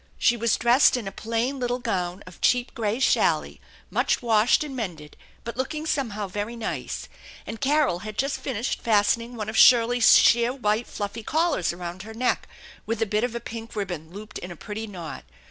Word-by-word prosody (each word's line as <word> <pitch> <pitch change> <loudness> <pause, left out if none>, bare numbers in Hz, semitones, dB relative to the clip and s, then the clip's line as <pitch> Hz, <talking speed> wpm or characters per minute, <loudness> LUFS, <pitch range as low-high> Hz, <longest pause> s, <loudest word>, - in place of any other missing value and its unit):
She 240 - +3
was 235 -1 +1
dressed 245 +2 +5
in 225 -5 -5
a - - -4
plain 230 +6 -2
little 245 0 -1
gown 180 -5 -3
of 185 - -14
cheap 245 -1 +2
gray 220 +1 -1
challis, 270 - +2 0.3
much - - +1
washed 225 +3 +3
and 285 -3 -7
mended, 170 - -6 0.3
but 235 - -6
looking 300 +5 -3
somehow 225 -10 -1
very 205 +5 -4
nice; 230 -2 -4 0.4
and 225 - -7
Carol 280 - +2
had 215 +1 -8
just 275 +1 -1
finished 250 -2 -3
fastening 230 +2 +2
one 215 -3 -4
of 220 - -5
Shirley's 240 0 +7
sheer 235 +1 +4
white 220 -2 0
fluffy 205 +2 -5
collars 315 - +1
around 175 +1 -7
her 220 +2 -10
neck, 250 +2 0 0.4
with 225 0 -2
a 225 - +2
bit 210 +1 0
of 245 -1 -2
a - - -2
pink 225 0 -8
ribbon 175 -6 -4
looped 205 +4 -9
in 180 - -8
a 175 - -8
pretty 215 +6 -6
knot. 175 -6 -8
225 Hz, 190 wpm, -25 LUFS, 205-245 Hz, 0.4 s, Shirley's